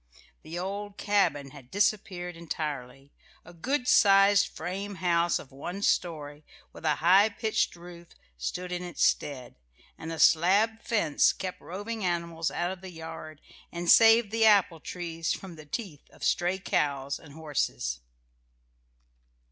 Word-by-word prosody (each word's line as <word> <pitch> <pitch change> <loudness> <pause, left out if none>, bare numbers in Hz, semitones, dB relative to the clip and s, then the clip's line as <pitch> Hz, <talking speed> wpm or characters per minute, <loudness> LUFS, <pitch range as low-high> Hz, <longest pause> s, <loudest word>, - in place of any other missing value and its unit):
The 160 +2 -8
old 200 +2 -5
cabin 145 -10 +1
had 130 -3 -14
disappeared 190 -3 -1
entirely. 145 -5 -6 0.3
A 175 - -13
good 250 - -2
sized 200 -1 +5
frame 195 +4 -6
house 175 -2 +1
of 135 - -11
one 175 +9 -6
story, 150 -5 -1 0.3
with - - -11
a 150 -1 +3
high 195 +5 +6
pitched 220 -1 -1
roof, 175 0 -12 0.3
stood 180 - -5
in 180 0 -3
its 175 -2 -3
stead, 130 - -1 0.4
and 160 - -6
a 165 - -5
slab 200 +9 +4
fence 210 -10 +2
kept 185 -1 -6
roving 205 +5 -6
animals 170 -2 -1
out 175 +1 -2
of 190 -1 -8
the 190 - -8
yard 160 -2 -9 0.3
and 170 0 +1
saved 225 -1 +6
the 225 0 +1
apple 200 -6 +4
trees 165 -1 -4
from 185 -3 -8
the 155 -1 -13
teeth 165 - -6
of - - -15
stray 180 +2 +1
cows 140 -6 -1
and 145 -3 -15
horses. 95 - -2
175 Hz, 145 wpm, -28 LUFS, 155-195 Hz, 0.4 s, high